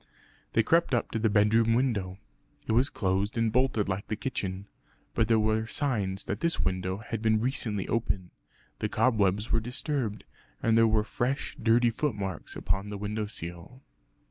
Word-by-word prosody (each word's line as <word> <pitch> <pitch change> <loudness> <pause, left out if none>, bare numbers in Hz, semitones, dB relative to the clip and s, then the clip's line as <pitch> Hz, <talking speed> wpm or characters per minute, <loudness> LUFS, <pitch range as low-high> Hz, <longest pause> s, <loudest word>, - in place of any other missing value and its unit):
They 115 - +4
crept 165 +1 +3
up 120 - -1
to 115 - -1
the 110 0 +2
bedroom 110 +2 +4
window. 105 -8 0 0.5
It - - -2
was 125 +5 +3
closed 100 +2 -1
and 115 -1 +2
bolted 125 -4 +2
like 95 +1 -3
the 110 - -2
kitchen. 100 -6 -4 0.5
But 110 - +2
there 115 -1 +4
were 110 +1 +1
signs 105 -9 -1
that - - -3
this 170 0 +1
window 95 0 -1
had 115 -3 -4
been 110 -1 +3
recently 110 -5 -1
open; 100 -5 -1 0.5
the - - -1
cobwebs 105 -3 +2
were 115 - +4
disturbed, 125 -2 -2 0.4
and 115 -1 +3
there 115 0 +6
were 110 -1 +3
fresh 125 +5 -2
dirty 115 +1 +4
footmarks 100 - -3
upon 95 +3 -1
the 105 - -5
window 105 +1 -3
sill. 90 +6 -7
110 Hz, 170 wpm, -28 LUFS, 100-120 Hz, 0.5 s, there